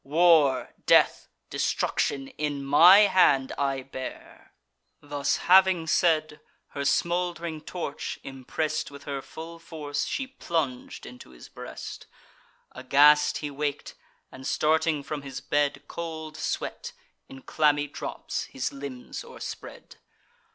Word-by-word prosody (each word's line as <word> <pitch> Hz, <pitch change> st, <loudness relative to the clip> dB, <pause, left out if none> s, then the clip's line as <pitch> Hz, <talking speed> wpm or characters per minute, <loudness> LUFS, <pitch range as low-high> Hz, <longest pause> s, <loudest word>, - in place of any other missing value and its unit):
War, 150 Hz, -3 st, +4 dB
death, -, -, +4 dB, 0.2 s
destruction, 135 Hz, -1 st, -1 dB
in 145 Hz, -2 st, -4 dB
my 175 Hz, +8 st, +8 dB
hand 145 Hz, -10 st, +4 dB
I 135 Hz, -1 st, -1 dB
bear." 130 Hz, -1 st, -9 dB, 0.5 s
Thus 145 Hz, 0 st, -1 dB
having 185 Hz, -2 st, +5 dB
said, 155 Hz, -2 st, +1 dB, 0.3 s
her 140 Hz, -, -6 dB
smould'ring 170 Hz, +1 st, -1 dB
torch, 160 Hz, -4 st, -5 dB
impress'd 135 Hz, +3 st, -3 dB
With 140 Hz, 0 st, -12 dB
her 140 Hz, -2 st, -4 dB
full 165 Hz, +4 st, -10 dB
force, 150 Hz, -3 st, -4 dB
she 270 Hz, -, -2 dB
plung'd 160 Hz, -, -3 dB
into 125 Hz, -, -12 dB
his 60 Hz, -1 st, -14 dB
breast. -, -, -9 dB, 0.6 s
Aghast 145 Hz, +3 st, +4 dB
he 145 Hz, -, -4 dB
wak'd; 145 Hz, 0 st, -3 dB, 0.4 s
and, 130 Hz, +1 st, -8 dB
starting 155 Hz, -1 st, +1 dB
from 150 Hz, +1 st, -5 dB
his 135 Hz, -2 st, -7 dB
bed, 145 Hz, -1 st, 0 dB
Cold 160 Hz, -2 st, -6 dB
sweat, -, -, -4 dB, 0.4 s
in 135 Hz, 0 st, -12 dB
clammy 145 Hz, -1 st, +2 dB
drops, 145 Hz, -, -5 dB
his 130 Hz, -, -4 dB
limbs 140 Hz, -3 st, -7 dB
o'erspread. -, -, -9 dB
145 Hz, 115 wpm, -27 LUFS, 140-160 Hz, 0.6 s, my